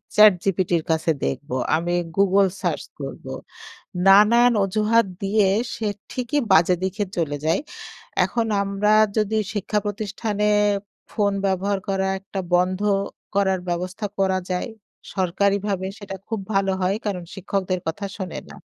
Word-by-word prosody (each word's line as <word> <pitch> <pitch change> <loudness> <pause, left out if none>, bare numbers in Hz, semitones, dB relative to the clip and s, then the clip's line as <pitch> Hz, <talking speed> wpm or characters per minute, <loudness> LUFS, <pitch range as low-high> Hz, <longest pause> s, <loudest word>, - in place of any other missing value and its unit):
Chat 210 -1 +8
জিপিটির 180 -3 +1
কাছে 160 +1 +1
দেখব। 70 - -3 0.3
আমি 170 +2 -1 0.3
গুগল 195 0 +4
সার্চ - - -1 0.2
করব। - - -7 0.8
নানান 220 +5 +7
অজুহাত 215 +3 +2 0.2
দিয়ে 200 +1 +3 0.3
সে 220 - -3 0.2
ঠিকই 255 +3 -1
বাজে 175 +1 +5
দিকে 190 +3 -2
চলে 155 -4 -1
যায়। 165 +3 +2 0.6
এখন 230 -1 -1 0.2
আমরা 200 +1 0 0.3
যদি 215 0 +1 0.2
শিক্ষা 210 +1 -1
প্রতিষ্ঠানে 210 0 -2 0.7
ফোন 205 -2 +1
ব্যবহার 195 +1 0
করা 190 -1 0
একটা 195 0 -5
বন্ধ 185 +2 +2 0.5
করার 190 -1 +2
ব্যবস্থা 180 +4 -2
করা 190 -1 +2
যায় 180 +6 -1 0.5
সরকারিভাবে 195 +1 0
সেটা 195 -2 -7
খুব 225 -2 -2
ভালো 195 -1 +2
হয়। 185 +2 +1
কারণ, 185 -4 -2
শিক্ষকদের 190 -1 -2
কথা 180 +5 -3
শোনে 185 -3 -5
না। - - -11
195 Hz, 130 wpm, -23 LUFS, 185-210 Hz, 0.8 s, Chat